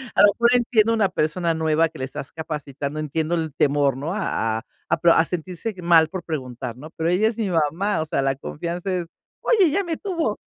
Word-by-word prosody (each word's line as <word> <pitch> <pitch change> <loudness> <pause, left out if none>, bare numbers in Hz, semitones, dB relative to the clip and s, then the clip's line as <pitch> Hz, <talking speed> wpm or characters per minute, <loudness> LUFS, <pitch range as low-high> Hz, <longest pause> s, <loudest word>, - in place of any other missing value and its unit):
a - - +5
lo 205 - +9
mejor 235 +3 +3
entiendo 230 -2 +3
una 210 -4 +2
persona 165 0 0
nueva 160 0 +2
que - - -13
la 130 - -2
estás 135 +1 -7
capacitando, 150 -2 -5
entiendo 155 +2 -1
el 160 -4 -2
temor, 140 -2 +2
¿no?, 150 +6 -3
a 115 - -1
a 115 - -5 0.3
a - - +2
pro 170 -1 +5
sentirse 180 +6 -4
mal 170 -2 +5
por 185 -2 -5
preguntar, 125 -5 -5
¿no? 155 +4 -10
Pero 165 +1 -1
ella 195 +5 +3
es 225 - -1
mi 210 -4 -1
mamá. 165 +4 +1
O 155 - -2
sea, 145 - -1
la 135 0 +1
confianza 175 +6 -4
es 175 -2 -2 0.3
oye, 420 -6 +4
ella 335 +6 +1
me 330 -3 -3
tuvo, 335 - -2
165 Hz, 220 wpm, -23 LUFS, 150-205 Hz, 0.3 s, lo